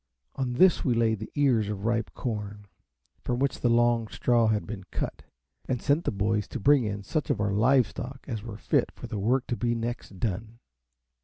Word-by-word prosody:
On 130 -2 -2
this 180 +7 +5
we 125 -4 +2
laid 110 -2 +2
the 110 - -7
ears 125 -8 +2
of 105 -1 -4
ripe 115 0 0
corn, 105 -3 -4 0.6
from 120 - -1
which 140 +2 0
the 120 - +3
long 120 -1 +3
straw 120 0 +2
had 110 -1 +1
been 100 -3 -6
cut, - - -4 0.5
and 125 -2 0
sent 150 +6 +1
the - - +1
boys 105 +1 0
to 130 - -5
bring 135 +2 +4
in 100 -1 -3
such 155 +6 -2
of 105 - +1
our 105 -1 0
live 125 +5 +4
stock 130 +6 -8
as 115 -6 -3
were 110 -1 -7
fit - - +1
for - - -10
the 105 - -4
work 125 +6 +1
to 120 - -2
be 120 0 0
next 115 -4 -5
done. 110 +2 -3
115 Hz, 210 wpm, -27 LUFS, 105-125 Hz, 0.6 s, this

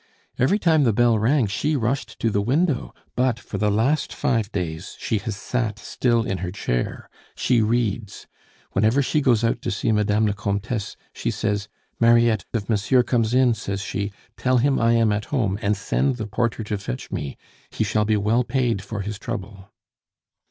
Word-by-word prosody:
Every 135 - +3
time 160 -7 +3
the 115 -4 +3
bell 120 0 +3
rang 125 +4 +3
she 145 +10 -1
rushed 120 -2 -2
to 115 - +2
the 100 - +1
window 140 - +1 0.2
but 125 -2 +1
for 100 - -6
the 105 +1 +2
last 120 +9 +1
five 115 -7 0
days 90 -1 -4
she 110 - -1
has 110 -1 -4
sat 110 0 -2
still 120 +2 0
in 95 -4 -2
her 90 0 -3
chair. - - -3 0.3
She 120 -3 +2
reads. 110 -2 -1 0.5
Whenever 110 +8 +3
she 150 +3 +1
goes 120 -5 +3
out 115 +1 +1
to 130 - -2
see 110 +1 0
Madame 105 0 +2
la 105 - +1
Comtesse, 105 +2 -3 0.2
she - - -2
says, 105 -3 -1 0.3
'Mariette, 115 -2 +4
if 105 -4 -2
monsieur 115 +4 +3
comes 120 -1 +1
in,' 130 -2 +5
says 100 -3 -4
she, 100 0 -3 0.3
'tell 130 0 +2
him 135 +3 +2
I 115 +1 +3
am 115 -2 +3
at 105 0 -1
home, 105 -8 -1
and 105 -1 +1
send 130 +6 0
the 110 -3 -4
porter 110 +2 -1
to 105 -1 -3
fetch 65 -11 -6
me; 70 - -4 0.3
he - - -1
shall 105 - +1
be 105 0 +2
well 110 +4 +2
paid 120 -4 0
for 100 +1 -5
his 105 +1 -5
trouble. 100 -4 -6
110 Hz, 185 wpm, -23 LUFS, 105-125 Hz, 0.5 s, in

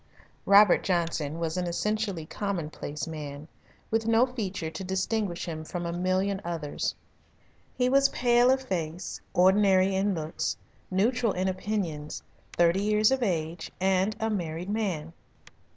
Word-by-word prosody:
Robert 200 -1 +7
Johnson 165 -4 -1
was 165 +1 -2
an 180 -1 -1
essentially 200 -1 -1
commonplace 160 -6 -4
man, 150 -2 -7 0.4
with 225 0 +1
no 230 +2 +5
feature 200 -10 -4
to 160 +4 -6
distinguish 190 0 -1
him 155 -2 -5
from 175 +2 -5
a 170 - -2
million 185 +2 0
others. 165 -4 -3 0.8
He 250 - +2
was 275 +1 +4
pale 240 0 +3
of 265 0 +2
face, 175 -5 -4
ordinary 190 +1 +4
in 195 +1 +1
looks, 155 0 -3 0.3
neutral 225 +4 +1
in 185 +1 -1
opinions, 185 -6 -3 0.3
thirty 175 +2 +3
years 210 +2 +3
of 265 -1 +1
age, 165 -5 -2
and 190 +2 +2
a 220 0 0
married 175 -1 -3
man. 180 -7 -2
185 Hz, 135 wpm, -28 LUFS, 165-210 Hz, 0.8 s, Robert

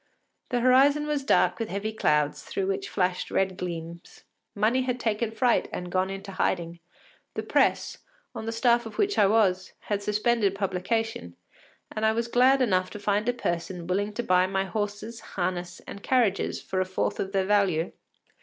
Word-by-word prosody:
The 245 -1 0
horizon 275 +4 +5
was 295 -2 -1
dark 270 - +3
with 225 -1 -3
heavy 205 +3 -3
clouds, 150 -7 +1
through 195 - -3
which 195 +1 -2
flashed 180 -1 -1
red 190 -1 0
gleams. 170 -1 -7 0.3
Money 220 +5 +2
had 250 -1 -2
taken 225 -1 0
fright 230 +2 +1
and 180 0 -5
gone 185 +1 +1
into 195 +1 -6
hiding; 170 -3 -1 0.6
the - - -2
Presse, - - +1 0.3
on 220 - -6
the - - -1
staff 235 0 +2
of 220 - -11
which 405 0 +1
I 200 - +6
was, 195 -3 +2
had 205 -1 -2
suspended 210 -1 +1
publication, 195 - -2 0.6
and 215 - -4
I 220 0 +4
was 230 +1 -1
glad 255 +3 +4
enough 185 -5 +1
to 210 - -8
find 205 +2 0
a - - +5
person 175 -6 -3
willing 200 +4 -1
to 240 - -3
buy 185 -2 +3
my 190 0 -1
horses, 210 +3 -4
harness, 180 -1 -4
and 200 - -9
carriages 230 -6 +1
for 185 0 -1
a - - 0
fourth 185 0 -2
of 190 - -2
their 195 -1 +1
value. 190 -5 +2
205 Hz, 180 wpm, -27 LUFS, 185-230 Hz, 0.6 s, I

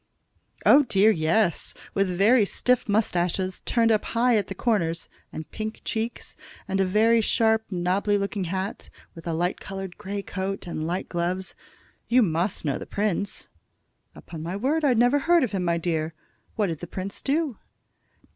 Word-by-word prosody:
"Oh, 290 - +8
dear, 215 -5 +4
yes; 170 +1 +1 0.2
with 195 0 +2
very 205 +6 +4
stiff 250 +4 0
mustaches, 185 -3 0
turned 230 -2 +3
up 215 -1 +2
high 240 +1 +2
at 205 -3 +1
the - - -6
corners, 170 -8 0 0.2
and 155 - -8
pink 220 0 -5
cheeks, 225 +1 -3 0.3
and 195 0 -1
a - - +3
very 225 +4 +4
sharp, 220 0 +2
nobby 190 +3 +1
looking 200 -1 -2
hat, 190 +3 -4 0.2
with 165 0 -11
a 165 - -1
light 175 +3 -1
colored 195 -1 -7
grey 200 0 -4
coat, 195 +1 -4
and 160 -2 -4
light 180 +3 -2
gloves. 180 +2 -2 0.5
You 245 +1 +5
must 175 0 -1
know 140 -3 0
the - - -8
prince." 205 -1 -1 0.7
"Upon 160 -2 -9
my 170 +4 -4
word, 280 +10 0
I 265 -4 +4
never 245 +5 +4
heard 340 +2 +4
of 250 - -1
him, 190 -3 -1
my 170 -1 +1
dear. 160 -1 -2 0.4
What 210 - +1
did 165 -5 -3
the 175 - -7
prince 190 +3 -5
do?" 290 -3 -1
195 Hz, 170 wpm, -25 LUFS, 175-225 Hz, 0.7 s, Oh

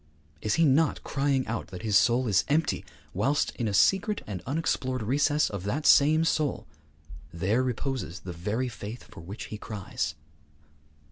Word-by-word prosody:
Is 110 - 0
he 165 - +4
not 150 +3 +2
crying 135 -2 0
out 110 0 -4
that 90 -2 -9
his 105 -3 0
soul 120 +5 +4
is 95 -4 +3
empty, 150 +2 +1 0.3
whilst, 135 +10 0
in 120 - -1
a 105 - -2
secret 195 - +3
and 95 -4 -5
unexplored 130 -4 -1
recess 145 +5 +2
of 100 -3 -5
that 140 +9 -2
same 155 +3 +6
soul, 155 -3 0 0.7
there 95 +8 +1
reposes 130 - -3
the 90 - -7
very 105 +9 -2
faith 115 0 -7
for - - -14
which 95 +6 -7
he 105 - -6
cries? 95 -9 -4
125 Hz, 160 wpm, -28 LUFS, 100-145 Hz, 0.7 s, same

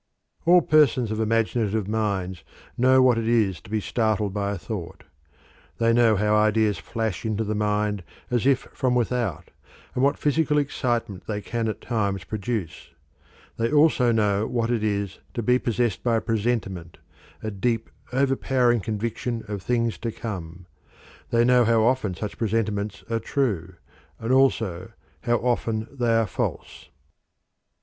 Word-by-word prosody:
All 175 +1 +7
persons 135 -7 +3
of 110 - -2
imaginative 110 -2 0
minds 100 -5 -2 0.3
know 130 +1 +5
what 125 -3 +4
it 115 - -2
is 110 -7 +2
to - - -15
be 110 0 0
startled 110 -2 0
by 100 -1 -1
a 100 - -3
thought; 90 -3 -7 0.7
they 115 0 +3
know 115 -2 +4
how 105 +1 +1
ideas 105 0 +2
flash 110 -6 -3
into 110 0 -1
the 110 0 -2
mind 105 -1 0 0.3
as 125 +1 +1
if 135 -1 +4
from 125 -1 0
without, 120 - -1 0.4
and 125 - 0
what 140 - +3
physical 150 0 +1
excitement 120 -8 -1
they 105 -2 -2
can 115 +2 -3
at 110 - -4
times 100 -5 -1
produce. 100 - -5 0.6
They 115 0 0
also 145 -5 +4
know 105 -2 +1
what 120 -1 -1
it 115 -3 0
is 100 -2 -2 0.2
to 120 - -2
be 125 +3 +3
possessed 120 -5 -1
by 120 -2 +1
a 110 - +1
presentiment, 100 -7 -2 0.5
a 110 - -3
deep, 115 +3 -1 0.2
overpowering 130 -2 +2
conviction 115 +3 -3
of 100 -2 -4
things 115 +1 0
to 115 - -3
come. 90 -7 -7 0.6
They 120 0 +3
know 125 0 +5
how 115 -1 +3
often 115 -6 +1
such 105 +4 -6
presentiments 105 -2 -1
are 115 0 -1
true, 100 - -1 0.4
and 115 +3 -1
also 110 -7 +1 0.3
how 120 -1 +3
often 115 -2 -1
they 120 -4 +1
are 115 0 +3
false. 90 - -4
110 Hz, 155 wpm, -24 LUFS, 105-120 Hz, 0.7 s, All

